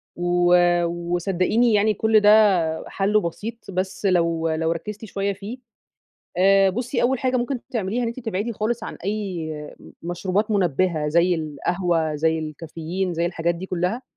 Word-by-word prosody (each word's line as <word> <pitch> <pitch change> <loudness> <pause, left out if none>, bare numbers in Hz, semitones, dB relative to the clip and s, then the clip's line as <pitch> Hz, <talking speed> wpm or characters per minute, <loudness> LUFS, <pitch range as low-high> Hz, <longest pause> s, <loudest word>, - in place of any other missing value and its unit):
و 175 0 +3 0.3
وصدّقيني 175 +6 0
يعني 210 +1 +3
كل 220 +2 +3
ده 205 -6 +4
حله 205 +2 +2
بسيط 210 +5 -6
بس 190 +2 -3
لو 170 -3 +2
لو 160 +1 0
ركّزتِ 210 +6 -5
شوية 200 0 -2
فيه. 205 +6 -8 0.8
آآ 195 +1 +5
بُصي 245 +4 -2
أول 255 +1 +2
حاجة 255 -1 0
ممكن 245 +1 -2
تعمليها 225 0 -1
إن 230 - 0
أنتِ 235 +2 -6
تبعدي 225 0 -3
خالص 225 +2 -2
عن - - -6
أي 190 -6 -3 0.5
مشروبات 185 +5 -1
منبهة 175 -5 +1
زي 170 +3 +3
القهوة، 160 +1 -1
زي 160 +2 +1
الكافيين، 165 +4 -4
زي 170 +1 0
الحاجات 170 -1 -1
دي 180 +3 -7
كلها، 185 +7 -2
185 Hz, 150 wpm, -23 LUFS, 170-215 Hz, 0.8 s, آآ